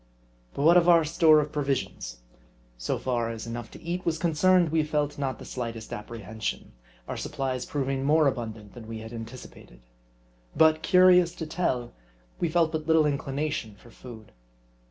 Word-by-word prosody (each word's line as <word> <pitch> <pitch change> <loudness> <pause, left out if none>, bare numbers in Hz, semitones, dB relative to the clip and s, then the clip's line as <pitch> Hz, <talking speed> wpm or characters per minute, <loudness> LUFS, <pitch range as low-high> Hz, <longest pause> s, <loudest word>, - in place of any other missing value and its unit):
But 140 - -2
what 170 +3 +7
of 175 0 +4
our 170 -2 +6
store 155 0 +5
of 150 0 -5
provisions? 135 - -3 0.5
So - - -2
far 120 -3 -1
as 115 -1 -6
enough 115 0 -6
to - - -13
eat 175 +2 -3
was 165 -1 0
concerned, 175 +2 +3
we 160 +1 +2
felt 150 -1 -2
not 135 -2 -2
the - - -11
slightest 115 -3 -6
apprehension; 110 - -6 0.4
our - - -4
supplies 130 -2 -3
proving 135 -2 -2
more 155 +2 +4
abundant 110 -6 -3
than 115 -3 -11
we 115 0 -6
had 110 +1 -9
anticipated. 115 - -10 0.7
But, 160 0 +4
curious 180 -1 +5
to 160 - -5
tell, 140 -7 -2 0.5
we 170 - 0
felt 165 -1 +2
but 155 -1 -4
little 160 -1 +4
inclination 140 -5 -2
for 115 +4 -18
food. 115 -4 -12
140 Hz, 165 wpm, -27 LUFS, 115-160 Hz, 0.7 s, what